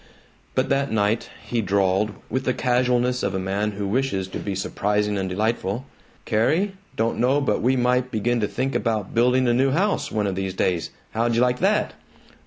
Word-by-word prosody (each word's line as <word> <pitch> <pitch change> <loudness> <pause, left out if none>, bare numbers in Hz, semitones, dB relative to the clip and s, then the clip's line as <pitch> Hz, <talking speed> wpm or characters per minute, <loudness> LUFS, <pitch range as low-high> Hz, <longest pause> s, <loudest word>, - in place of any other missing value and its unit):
But 130 - +1
that 140 0 +1
night 110 +1 +1 0.2
he 120 -1 -1
drawled, 100 +1 +1
with 130 +3 -2
the 130 - +1
casualness 125 0 +1
of 95 - -1
a - - 0
man 100 +3 -1
who 100 0 -4
wishes 100 -4 0
to - - -5
be 100 -2 -3
surprising 105 +2 0
and 95 -1 -2
delightful, 110 +3 -1 0.4
"Carrie, 160 - +1 0.2
don't 115 0 0
know 130 +4 +3
but 125 -8 +1
what - - -6
we 130 +3 +3
might 125 0 +2
begin 120 +1 0
to 105 - +1
think 135 +5 -2
about 110 -4 -1
building 125 +2 +3
a 120 - +3
new 130 +3 +3
house, 190 +9 0
one 105 -1 0
of 100 - -1
these 95 0 -3
days. 90 -3 0 0.2
How'd 115 +1 0
you 115 - +3
like 125 0 +2
that?" - - +2
115 Hz, 195 wpm, -23 LUFS, 100-125 Hz, 0.4 s, know